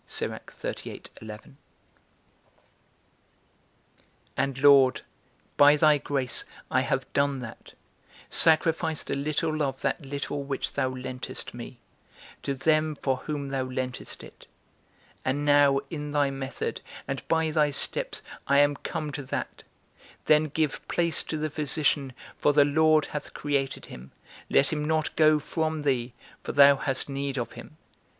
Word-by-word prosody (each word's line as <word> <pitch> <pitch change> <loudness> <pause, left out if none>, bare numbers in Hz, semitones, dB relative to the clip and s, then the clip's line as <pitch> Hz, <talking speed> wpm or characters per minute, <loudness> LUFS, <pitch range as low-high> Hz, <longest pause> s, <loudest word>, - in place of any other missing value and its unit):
And, 135 -2 -1
Lord, 140 -3 +6 0.6
by 145 +1 +7
thy 150 0 +5
grace, 135 -3 -1 0.3
I - - +3
have - - -2
done 140 -1 +1
that, 115 -2 -10 0.5
sacrificed 160 -1 +3
a - - +1
little 155 +2 -1
of 135 -2 -2
that 165 - -1
little 140 +1 -4
which 140 -1 -3
thou 130 -2 0
lentest 130 0 -5
me, 120 +1 -9 0.6
to 140 - -2
them 155 +2 +2
for 135 -2 -1
whom 145 0 -4
thou 135 -1 -1
lentest 130 0 -4
it: - - -14 0.8
and 140 +3 -1
now 145 -1 +5
in 150 -2 -5
thy 145 -2 +2
method, 135 0 -4 0.3
and - - -3
by 160 -1 +1
thy 150 -1 +3
steps, 140 - -2 0.2
I 140 - +4
am 145 0 +4
come 150 +2 -4
to 145 - -5
that, 130 - -5 0.6
Then 155 0 +5
give 155 -1 -1
place 170 -1 +2
to 155 - -4
the 155 0 -2
physician, 145 -2 0 0.3
for 145 - +3
the 145 0 +6
Lord 155 +1 +4
hath 150 - -7
created 140 -2 -2
him; 65 +2 -12 0.4
let 140 +3 +3
him 150 -1 -2
not 155 0 0
go 155 -1 +5
from 155 0 -2
thee, 125 -4 0 0.3
for - - -4
thou 140 0 +7
hast 135 -2 -1
need 140 0 -3
of 120 -2 -3
him. 120 +6 -12
145 Hz, 135 wpm, -27 LUFS, 135-155 Hz, 0.8 s, by